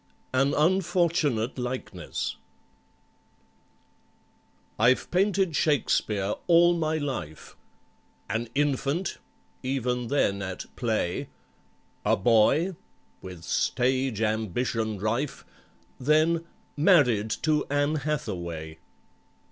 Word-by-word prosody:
AN 135 Hz, +2 st, +2 dB
UNFORTUNATE 160 Hz, -, +1 dB
LIKENESS 125 Hz, +1 st, -4 dB, 2.4 s
I'VE 120 Hz, +4 st, +3 dB
painted 190 Hz, -2 st, +2 dB
SHAKESPEARE 105 Hz, -10 st, +1 dB
all 175 Hz, 0 st, +6 dB
my 160 Hz, -1 st, 0 dB
life— 95 Hz, -, -5 dB, 0.7 s
"An 115 Hz, +2 st, -2 dB
infant" 145 Hz, +5 st, 0 dB, 0.4 s
(even 125 Hz, -2 st, -1 dB
then 100 Hz, -7 st, +1 dB
at 95 Hz, -1 st, -5 dB
"play"!) 110 Hz, -7 st, -1 dB, 0.7 s
"A -, -, +3 dB
boy," 120 Hz, -, +3 dB, 0.5 s
with 90 Hz, -3 st, -9 dB
stage 125 Hz, +4 st, 0 dB
ambition 110 Hz, 0 st, -1 dB
rife, 115 Hz, +8 st, -2 dB, 0.5 s
Then 155 Hz, +4 st, +2 dB, 0.3 s
"Married 145 Hz, -, +4 dB
to 150 Hz, -1 st, +1 dB
ANN 145 Hz, +2 st, +1 dB
HATHAWAY." 85 Hz, -, -4 dB
130 Hz, 80 wpm, -27 LUFS, 110-155 Hz, 2.4 s, all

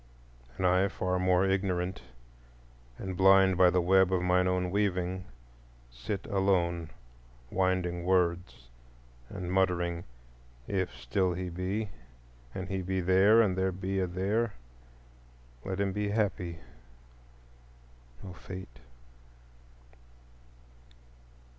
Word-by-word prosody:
And 95 Hz, -, -1 dB
I, 90 Hz, +2 st, +4 dB
far 90 Hz, -1 st, -2 dB
more 90 Hz, 0 st, +3 dB
ignorant, 95 Hz, -1 st, -1 dB, 1.0 s
and 95 Hz, -1 st, -5 dB
blind 95 Hz, 0 st, +5 dB
by 90 Hz, 0 st, +6 dB
the 90 Hz, 0 st, +1 dB
web 95 Hz, +1 st, +4 dB
of 90 Hz, -1 st, +1 dB
mine 90 Hz, 0 st, +3 dB
own 90 Hz, -1 st, 0 dB
weaving, 95 Hz, -2 st, -1 dB, 0.7 s
sit 100 Hz, -, -5 dB
alone 90 Hz, -4 st, 0 dB, 0.6 s
winding 90 Hz, -2 st, 0 dB
words 90 Hz, -7 st, 0 dB, 0.6 s
and 90 Hz, -2 st, -5 dB
muttering, 85 Hz, -2 st, 0 dB, 0.6 s
"If 95 Hz, -2 st, -1 dB
still 90 Hz, +10 st, 0 dB
he 90 Hz, 0 st, -4 dB
be, 95 Hz, +5 st, -3 dB, 0.6 s
and 95 Hz, -1 st, -4 dB
he 95 Hz, 0 st, -3 dB
be 95 Hz, +1 st, -2 dB
There, 95 Hz, +5 st, +5 dB
and 95 Hz, -4 st, 0 dB
there 95 Hz, 0 st, 0 dB
be 95 Hz, +1 st, -3 dB
a 95 Hz, -, 0 dB
There, 100 Hz, +5 st, -1 dB, 1.1 s
let 95 Hz, 0 st, -4 dB
him 100 Hz, -1 st, 0 dB
be 105 Hz, 0 st, -1 dB
happy, 100 Hz, -5 st, -1 dB, 1.7 s
O 95 Hz, -2 st, -8 dB
Fate!" 90 Hz, -10 st, -10 dB
95 Hz, 110 wpm, -30 LUFS, 90-95 Hz, 1.7 s, by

